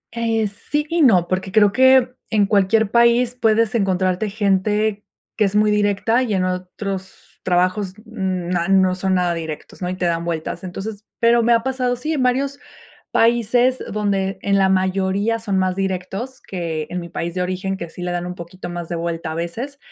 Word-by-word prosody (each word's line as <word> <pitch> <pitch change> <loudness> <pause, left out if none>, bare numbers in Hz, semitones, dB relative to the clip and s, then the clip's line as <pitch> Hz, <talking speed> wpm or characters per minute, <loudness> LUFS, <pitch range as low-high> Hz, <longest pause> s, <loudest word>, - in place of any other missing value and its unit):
Eh, 225 -1 0
sí 295 +9 -3
y 335 0 +1
no, 190 - +5
porque 185 +1 -2
creo 205 -1 +5
que 260 +2 +5 0.2
en 210 -2 +3
cualquier 205 +1 +2
país 235 +1 +4
puedes 225 0 +2
encontrarte 190 -1 0
gente 210 +1 0 0.3
que 215 - +2
es 200 +1 -2
muy 210 0 +4
directa, 210 +4 +2
y 220 -6 0
en 185 - +1
otros 185 +1 -6
trabajos 185 +2 0
na 185 -5 -2
no 190 -1 +4
son 190 +1 0
nada 180 -1 +1
directos, 160 +2 -7
¿no?, 180 - -2
y 185 - -3
te 185 - -2
dan 170 0 0
vueltas. 170 +1 -4
Entonces, 200 +3 -6 0.2
pero 235 0 +4
me 235 - +2
ha 230 -1 +2
pasado, 255 -2 0
sí, 305 +6 -3
en 285 - -1
varios 270 +3 0 0.5
países 240 +2 +3
donde 195 -2 -1
en 200 0 +1
la 190 0 +4
mayoría 190 +4 +1
son 205 -4 -1
más 185 -1 0
directos, 195 +6 -3
que 165 -4 -4
en 180 - -4
mi 170 -1 -9
país 170 +1 -4
de 180 - -1
origen, 185 +1 -2
que 170 -3 -7
sí 170 - -11
le 180 - -2
dan 175 0 -2
un 180 - -5
poquito 175 +1 -8
más 175 -1 -5
de 170 - -3
vuelta 165 -1 -3
a - - -5
veces. 230 - -5
195 Hz, 195 wpm, -20 LUFS, 180-225 Hz, 0.5 s, no